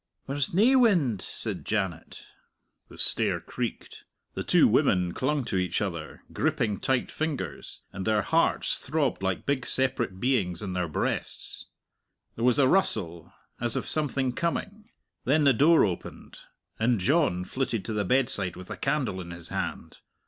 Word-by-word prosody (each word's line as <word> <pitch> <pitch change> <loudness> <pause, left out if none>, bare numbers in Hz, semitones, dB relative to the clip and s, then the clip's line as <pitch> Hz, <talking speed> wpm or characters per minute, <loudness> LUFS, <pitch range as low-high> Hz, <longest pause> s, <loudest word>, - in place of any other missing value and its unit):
"There's 140 +1 +1
nae 215 +9 +4
wind!" 175 - +3
said - - -5
Janet. 95 -6 -3 0.7
The - - -13
stair - - +3
creaked. - - -6 0.3
The - - -4
two - - +5
women 90 -2 +2
clung 140 0 -1
to 95 - -2
each 90 -1 0
other, 85 -6 -5
gripping 105 -3 0
tight 130 -2 0
fingers, 140 - -4
and 95 - -5
their 105 0 +1
hearts 165 +7 +2
throbbed 140 -5 -1
like 95 -1 -2
big 140 -3 0
separate 115 -7 0
beings 100 -8 0
in 95 -3 -4
their 90 -1 -1
breasts. 75 - -3 0.7
There 115 - -4
was 125 -1 +4
a 140 -2 +5
rustle, 85 - +1 0.3
as 120 -1 0
of - - -2
something 135 -4 +1
coming; 205 - -3 0.4
then 150 +4 +3
the 140 -2 +5
door 155 +5 +5
opened, 90 -4 -6 0.4
and 115 0 +2
John 110 - +1
flitted 120 -5 -2
to 110 - -3
the 105 -1 0
bedside 105 -5 +1
with 90 0 -10
a - - -5
candle 135 -9 -1
in 85 - -9
his 85 -1 -6
hand. - - -5
120 Hz, 155 wpm, -27 LUFS, 95-140 Hz, 0.7 s, two